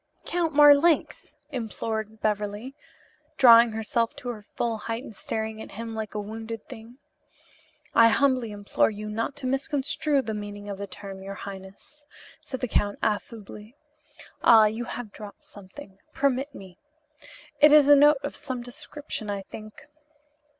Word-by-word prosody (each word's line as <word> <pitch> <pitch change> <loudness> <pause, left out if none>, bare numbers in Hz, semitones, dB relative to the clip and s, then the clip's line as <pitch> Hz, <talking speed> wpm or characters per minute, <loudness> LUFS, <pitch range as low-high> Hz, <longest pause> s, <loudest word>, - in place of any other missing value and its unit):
"Count 340 -2 -1
Marlanx!" 295 +2 +4 0.2
implored 220 -3 -4
Beverly, 210 +4 -2 0.6
drawing 235 -3 +7
herself 225 +1 -1
to 280 -3 -7
her 225 -3 -6
full 230 -2 -1
height 230 +3 -4
and 225 - -11
staring 220 +2 -4
at - - -10
him 225 +2 -6
like 220 -1 -5
a - - -1
wounded 225 +1 -7
thing. 230 +3 -12 1.0
"I 230 - +7
humbly 255 -1 +2
implore 205 -1 +1
you 210 0 -7
not 225 +6 -3
to 285 - -8
misconstrue 275 +1 0
the 220 - -4
meaning 205 -1 -7
of 200 -1 -6
the 200 - -5
term, 195 -1 -9
your 195 +1 -7
highness," 200 +10 -11 0.4
said 260 - -7
the 250 - -1
Count 205 -2 0
affably, 210 +1 -4 0.7
"Ah, 225 -2 +8
you 220 +3 -2
have 240 -3 -7
dropped 205 0 -11
something. 195 +1 -13
Permit 275 0 0
me. 185 -2 -12 0.8
It 300 +1 +7
is 300 -2 +7
a 290 - +9
note 295 +1 +6
of - - -4
some 260 -4 -6
description, 245 -2 -7
I 200 -1 -3
think." 215 +2 -11
225 Hz, 150 wpm, -26 LUFS, 210-265 Hz, 1.0 s, a